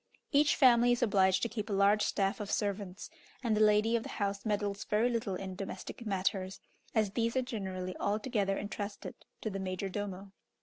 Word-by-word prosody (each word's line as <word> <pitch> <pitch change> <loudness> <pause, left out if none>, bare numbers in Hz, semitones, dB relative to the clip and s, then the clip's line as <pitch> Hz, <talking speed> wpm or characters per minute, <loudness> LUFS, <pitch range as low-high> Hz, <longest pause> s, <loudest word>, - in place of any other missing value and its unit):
Each 290 +1 +4
family 245 -2 +6
is 240 - 0
obliged 190 -4 +3
to - - +2
keep 220 -1 -5
a - - -1
large 200 +2 +4
staff 195 0 0
of 205 -1 -5
servants, 200 +2 -2 0.3
and 225 -3 +2
the 215 - +2
lady 215 +2 +4
of 230 - +1
the - - -8
house 200 0 -2
meddles 205 -1 -1
very 220 +3 +2
little 225 -5 -1
in 190 0 -5
domestic 195 +4 -6
matters, 190 -1 -1 0.4
as 215 -3 +2
these 230 +3 0
are 260 - +2
generally 190 -6 -4
altogether 205 -1 0
entrusted 205 0 -5 0.3
to 220 - -3
the 195 - -4
major 190 +1 -3
domo. 195 0 -5
205 Hz, 185 wpm, -32 LUFS, 195-225 Hz, 0.4 s, family